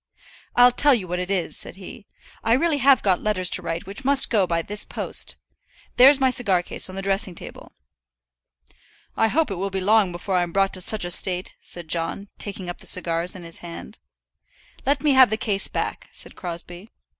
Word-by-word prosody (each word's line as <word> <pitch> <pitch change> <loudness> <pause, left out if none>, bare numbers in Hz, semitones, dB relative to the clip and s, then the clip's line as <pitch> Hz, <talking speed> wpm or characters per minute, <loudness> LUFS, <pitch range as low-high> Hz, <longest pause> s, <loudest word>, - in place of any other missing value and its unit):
"I'll 245 0 +6
tell 285 +2 +3
you 195 -6 -4
what 180 +1 -3
it 180 +1 -4
is," 190 -4 -2
said - - -6
he. 200 +3 -12 0.4
"I 225 - +2
really 295 +3 +1
have 270 -1 +4
got 190 -3 +1
letters 185 -4 +1
to - - 0
write 165 +1 -5
which 200 +7 -8
must 275 0 +4
go 205 -5 +2
by 170 -1 -1
this 210 +3 -4
post. - - -4 0.6
There's 265 +3 +7
my 260 -1 +2
cigar 200 -9 +1
case - - +2
on 185 - -9
the 195 - -5
dressing 195 -1 0
table." - - -10 1.4
"I 225 - +2
hope 310 +2 0
it 195 - -4
will 195 +1 -2
be 190 0 -4
long 205 0 +2
before 180 +2 -3
I'm 175 -1 -1
brought 195 0 +1
to 185 - -4
such 210 0 +1
a 175 - -2
state," 180 0 +3
said 175 -2 -7
John, 170 +5 -2
taking 195 -3 -6
up 175 - -7
the - - -2
cigars 175 0 +1
in 180 - -10
his 165 0 -3
hand. 170 -1 -10 0.9
"Let 285 +2 +1
me 300 - +3
have 260 -3 +6
the 215 - -1
case 205 -3 0
back," - - -5
said - - -10
Crosbie. 175 +3 -8
195 Hz, 205 wpm, -22 LUFS, 180-230 Hz, 1.4 s, There's